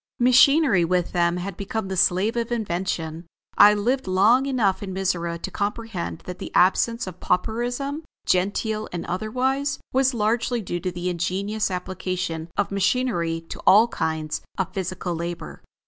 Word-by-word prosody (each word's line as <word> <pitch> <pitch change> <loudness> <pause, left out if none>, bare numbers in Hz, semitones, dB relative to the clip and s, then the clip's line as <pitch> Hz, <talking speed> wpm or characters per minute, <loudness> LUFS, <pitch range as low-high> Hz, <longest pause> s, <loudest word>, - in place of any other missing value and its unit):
Machinery, 255 - +5
with 180 +1 0
them, 175 0 +1
had 185 +1 -5
become 200 +2 -4
the 190 - -3
slave 185 +4 +2
of 235 0 -2
invention. 175 -6 -3 0.3
I 210 +1 +7
lived 245 +5 0
long 215 +9 +4
enough 220 -8 +1
in 195 -2 -5
Mizora 175 -3 -1
to - - -6
comprehend 205 -5 -3
that 180 0 -7
the - - -7
absence 230 +6 +3
of 185 -2 -9
pauperism, 245 - -1 0.2
genteel 215 +4 0
and 175 -1 -4
otherwise, 255 +9 -1 0.2
was 265 0 +2
largely 230 +2 0
due 175 -1 -3
to 180 +1 -3
the 175 +1 -3
ingenious 195 +5 -1
application 180 -3 -4
of 205 - 0
machinery 195 -5 0
to - - -6
all 215 +5 +7
kinds 160 -6 -2 0.2
of 190 - -2
physical 185 -1 -3
labor. 170 +1 -6
195 Hz, 150 wpm, -24 LUFS, 180-230 Hz, 0.3 s, I